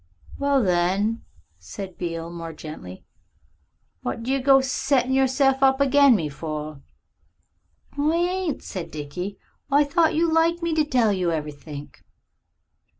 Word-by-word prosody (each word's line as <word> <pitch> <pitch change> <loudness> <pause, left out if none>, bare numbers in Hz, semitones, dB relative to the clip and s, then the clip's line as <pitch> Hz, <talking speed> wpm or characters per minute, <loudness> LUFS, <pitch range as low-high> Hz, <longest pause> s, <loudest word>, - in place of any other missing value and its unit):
"Well, 280 -2 +2
then," 190 +5 +1 0.4
said 175 - -8
Beale 165 -1 -4
more 165 -1 -7
gently, 150 - -10 1.0
"what 125 - -4
do 255 - -2
you 270 0 +1
go 270 +1 +6
settin' 265 0 0
of - - +2
yourself 270 0 +2
up 265 0 +4
agin 280 -1 +5
me 165 -7 -1
for?" 150 0 -6 1.1
"I 300 +3 +1
ain't," 350 -2 -1
said 180 -3 -6
Dickie. 165 +7 -6 0.3
"I 285 +1 +5
thought 320 +3 +2
you 330 0 +2
liked 335 +1 +2
me 335 -1 0
to 310 -1 +3
tell 245 -7 +2
you 180 -3 0
everythink." 150 -1 -7
240 Hz, 140 wpm, -24 LUFS, -, 1.1 s, go